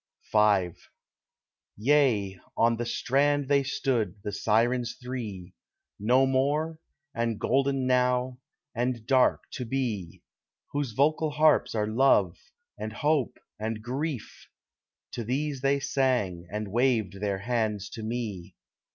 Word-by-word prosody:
V 105 Hz, -4 st, +4 dB, 1.1 s
Yea, 110 Hz, -6 st, +2 dB, 0.2 s
on 115 Hz, 0 st, +3 dB
the 120 Hz, 0 st, -3 dB
strand 145 Hz, +3 st, +1 dB
they 140 Hz, 0 st, +4 dB
stood, 125 Hz, -7 st, -1 dB
the 105 Hz, -, -3 dB
Sirens 115 Hz, +4 st, +1 dB
three— 120 Hz, -8 st, -6 dB, 0.5 s
No 125 Hz, +6 st, +4 dB
More, 145 Hz, +5 st, 0 dB, 0.3 s
and 115 Hz, -2 st, -1 dB
golden 135 Hz, 0 st, +1 dB
Now, 125 Hz, 0 st, +1 dB, 0.3 s
and 120 Hz, -1 st, -2 dB
dark 130 Hz, +1 st, +3 dB
To 125 Hz, -, -4 dB
be, 115 Hz, -8 st, -3 dB, 0.5 s
Whose 145 Hz, -5 st, -2 dB
vocal 155 Hz, +5 st, +2 dB
harps 150 Hz, -4 st, +3 dB
are 105 Hz, -1 st, +1 dB
love, 110 Hz, -6 st, +3 dB, 0.4 s
and 110 Hz, 0 st, -5 dB
hope, 145 Hz, +2 st, 0 dB, 0.2 s
and 110 Hz, 0 st, -3 dB
grief; 135 Hz, +1 st, -4 dB, 0.6 s
To 120 Hz, -, -4 dB
these 135 Hz, +3 st, -2 dB
they 140 Hz, +1 st, +2 dB
sang, 120 Hz, -12 st, 0 dB
and 105 Hz, -1 st, -4 dB
waved 115 Hz, -5 st, +1 dB
their 100 Hz, -2 st, 0 dB
hands 105 Hz, -2 st, -1 dB
to 115 Hz, -, -7 dB
me. 110 Hz, -6 st, -5 dB
120 Hz, 120 wpm, -27 LUFS, 105-135 Hz, 1.1 s, V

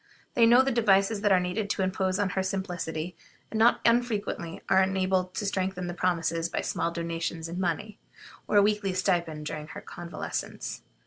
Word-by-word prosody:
They 230 Hz, -1 st, +5 dB
know 245 Hz, +3 st, +7 dB
the 270 Hz, -, 0 dB
devices 200 Hz, -2 st, +3 dB
that 205 Hz, -1 st, +2 dB
are 185 Hz, -, +6 dB
needed 180 Hz, +4 st, -2 dB
to 195 Hz, -, 0 dB
impose 185 Hz, 0 st, 0 dB
on 205 Hz, -2 st, +1 dB
her 190 Hz, -, 0 dB
simplicity, 180 Hz, -3 st, -3 dB, 0.4 s
and 220 Hz, -, -1 dB
not 235 Hz, +2 st, +5 dB
unfrequently 230 Hz, -8 st, 0 dB
are 190 Hz, -, +5 dB
enabled 190 Hz, -1 st, +1 dB
to 210 Hz, -, -2 dB
strengthen 190 Hz, -2 st, -1 dB
their 175 Hz, 0 st, -4 dB
promises 165 Hz, -2 st, 0 dB
by -, -, -2 dB
small -, -, -1 dB
donations 170 Hz, -1 st, -3 dB
in 170 Hz, +2 st, -5 dB
money, 190 Hz, +4 st, -2 dB, 0.5 s
or -, -, -1 dB
a 200 Hz, -, +7 dB
weekly 205 Hz, -2 st, +1 dB
stipend 170 Hz, -4 st, 0 dB
during 150 Hz, 0 st, -5 dB
her -, -, -8 dB
convalescence. 175 Hz, -1 st, -5 dB
185 Hz, 180 wpm, -28 LUFS, 170-205 Hz, 0.5 s, know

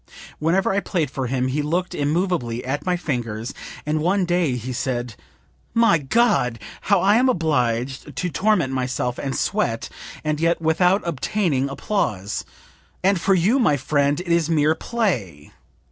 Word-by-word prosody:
Whenever 180 Hz, +5 st, +2 dB
I 200 Hz, -, +2 dB
played 165 Hz, -8 st, -2 dB
for 130 Hz, -2 st, -3 dB
him 130 Hz, 0 st, 0 dB
he 145 Hz, +3 st, 0 dB
looked 175 Hz, +5 st, -1 dB
immovably 145 Hz, -6 st, -1 dB
at 140 Hz, +7 st, -3 dB
my 180 Hz, -1 st, +2 dB
fingers, 120 Hz, -7 st, -3 dB, 0.3 s
and 155 Hz, +1 st, 0 dB
one 185 Hz, +4 st, +1 dB
day 175 Hz, -6 st, +1 dB
he 125 Hz, +1 st, -5 dB
said 120 Hz, -1 st, -2 dB, 0.6 s
'My 230 Hz, -8 st, +5 dB
God! 135 Hz, -, +2 dB, 0.3 s
how 200 Hz, -3 st, +5 dB
I 205 Hz, +3 st, +4 dB
am 255 Hz, +2 st, +4 dB
obliged 135 Hz, -, -1 dB
to 180 Hz, -, -1 dB
torment 185 Hz, -10 st, +1 dB
myself 125 Hz, -1 st, -2 dB
and 135 Hz, -2 st, -3 dB
sweat, 115 Hz, -1 st, -1 dB, 0.3 s
and 155 Hz, -1 st, -1 dB
yet 165 Hz, +1 st, +2 dB
without 180 Hz, +4 st, +2 dB
obtaining 155 Hz, -3 st, 0 dB
applause; 120 Hz, -, -2 dB, 0.6 s
and 190 Hz, -2 st, +3 dB
for 195 Hz, +1 st, +3 dB
you, 200 Hz, +10 st, +3 dB
my 150 Hz, -, +3 dB
friend, 145 Hz, +1 st, +1 dB
it 180 Hz, -, -7 dB
is 170 Hz, -1 st, +2 dB
mere 155 Hz, -1 st, +3 dB
play!' 145 Hz, -, -2 dB
155 Hz, 155 wpm, -22 LUFS, 130-180 Hz, 0.6 s, My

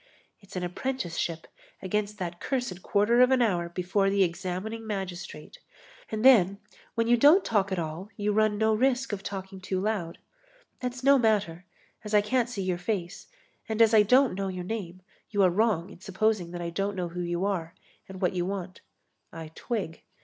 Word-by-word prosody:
It's 195 Hz, -3 st, -15 dB
an 180 Hz, -, -2 dB
apprenticeship 175 Hz, -5 st, -3 dB, 0.3 s
against 210 Hz, +2 st, -2 dB
that 175 Hz, -3 st, -5 dB
cursed 245 Hz, -9 st, -3 dB
quarter 215 Hz, +6 st, +3 dB
of 250 Hz, -, +6 dB
an 260 Hz, -1 st, +3 dB
hour 180 Hz, -8 st, +1 dB
before 185 Hz, +3 st, 0 dB
the 200 Hz, 0 st, +3 dB
examining 190 Hz, +5 st, -4 dB
magistrate. 185 Hz, -6 st, -6 dB, 0.5 s
And 220 Hz, +2 st, -2 dB
then, 200 Hz, -7 st, +6 dB, 0.4 s
when 230 Hz, -1 st, +1 dB
you 240 Hz, +1 st, +5 dB
don't 295 Hz, +10 st, +6 dB
talk 200 Hz, -3 st, +1 dB
at 190 Hz, -, -1 dB
all, 165 Hz, +4 st, -4 dB
you 210 Hz, 0 st, 0 dB
run 215 Hz, 0 st, +2 dB
no 220 Hz, +1 st, +2 dB
risk 255 Hz, +1 st, +1 dB
of 195 Hz, -, -3 dB
talking 190 Hz, -1 st, -7 dB
too 185 Hz, 0 st, -2 dB
loud. 195 Hz, -5 st, -2 dB, 0.6 s
That's 250 Hz, 0 st, -5 dB
no 275 Hz, 0 st, +6 dB
matter, 205 Hz, -7 st, +1 dB, 0.4 s
as 210 Hz, 0 st, -2 dB
I 210 Hz, -, +6 dB
can't 240 Hz, +3 st, 0 dB
see 205 Hz, -5 st, -4 dB
your 180 Hz, -2 st, -1 dB
face 180 Hz, -2 st, -4 dB, 0.4 s
and 220 Hz, 0 st, -2 dB
as 225 Hz, -1 st, +6 dB
I 215 Hz, -, +8 dB
don't 250 Hz, +4 st, +4 dB
know 195 Hz, +1 st, -3 dB
your 185 Hz, -1 st, -4 dB
name, 185 Hz, -3 st, -5 dB, 0.3 s
you 205 Hz, -2 st, +2 dB
are 185 Hz, -, +5 dB
wrong 200 Hz, -3 st, +1 dB
in -, -, -13 dB
supposing 195 Hz, -1 st, 0 dB
that 175 Hz, 0 st, -6 dB
I 170 Hz, 0 st, -4 dB
don't 195 Hz, +3 st, -2 dB
know 180 Hz, -2 st, -3 dB
who 180 Hz, +1 st, -5 dB
you 175 Hz, +2 st, -1 dB
are 175 Hz, -4 st, -2 dB, 0.3 s
and 190 Hz, -1 st, -8 dB
what 185 Hz, 0 st, +1 dB
you 180 Hz, -1 st, -1 dB
want. 185 Hz, -1 st, -5 dB, 0.5 s
I 160 Hz, -1 st, -8 dB
twig. 200 Hz, -8 st, -4 dB
195 Hz, 190 wpm, -27 LUFS, 180-220 Hz, 0.6 s, I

